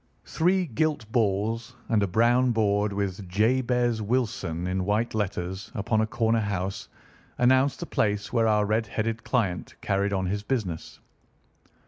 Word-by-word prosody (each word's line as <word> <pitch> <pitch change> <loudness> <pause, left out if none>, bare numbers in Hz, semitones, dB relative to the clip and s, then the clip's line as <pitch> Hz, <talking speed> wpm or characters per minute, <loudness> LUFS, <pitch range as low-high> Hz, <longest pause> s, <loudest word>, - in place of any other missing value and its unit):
Three 180 +3 +1
gilt 145 -4 -1
balls 115 +2 0
and 110 -2 +2
a 100 - +2
brown 120 +5 +3
board 105 -1 +1
with 100 -1 -3
"JABEZ 120 +3 +1
WILSON" 105 -7 -1
in 95 +1 -1
white 105 +4 0
letters, 95 -1 -3
upon 110 +1 +1
a 110 - 0
corner 115 0 +1
house, 95 -2 -3 0.5
announced 130 +3 +3
the - - -2
place 105 +1 -1
where 115 -2 +3
our 105 -1 +3
red 110 +2 0
headed 115 +2 -2
client 100 -9 -1
carried 100 0 0
on 95 -1 0
his 100 +3 -1
business. 105 -8 -3
110 Hz, 145 wpm, -26 LUFS, 100-120 Hz, 0.5 s, brown